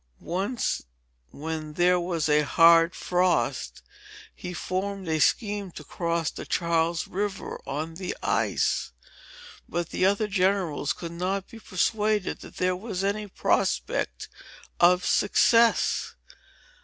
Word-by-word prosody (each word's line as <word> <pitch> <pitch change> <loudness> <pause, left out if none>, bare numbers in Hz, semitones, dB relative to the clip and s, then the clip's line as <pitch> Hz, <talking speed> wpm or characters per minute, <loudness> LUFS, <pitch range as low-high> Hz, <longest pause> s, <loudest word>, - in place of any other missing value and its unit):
Once, 200 +7 -1 0.5
when 155 0 -5
there 180 +2 +3
was 170 -3 -1
a 150 0 +4
hard 165 +3 +5
frost, 180 0 0 0.5
he 180 - -7
formed 190 +2 -3
a 160 -1 0
scheme 205 - +1
to 155 - -10
cross 170 0 -2
the - - -7
Charles 170 -1 0
River 200 +1 -4
on 155 +3 -3
the 180 +2 -5
ice. - - 0 0.8
But 170 -1 -2
the 185 - +2
other 200 +2 +1
Generals 185 -7 0
could 170 -1 -7
not 185 +3 -2
be 230 - -12
persuaded 210 +1 0
that - - -13
there 185 0 +1
was 195 -1 -4
any 205 +1 -1
prospect 190 - -1 0.5
of 180 +1 +5
success." 230 0 +3
180 Hz, 120 wpm, -26 LUFS, 165-200 Hz, 0.8 s, hard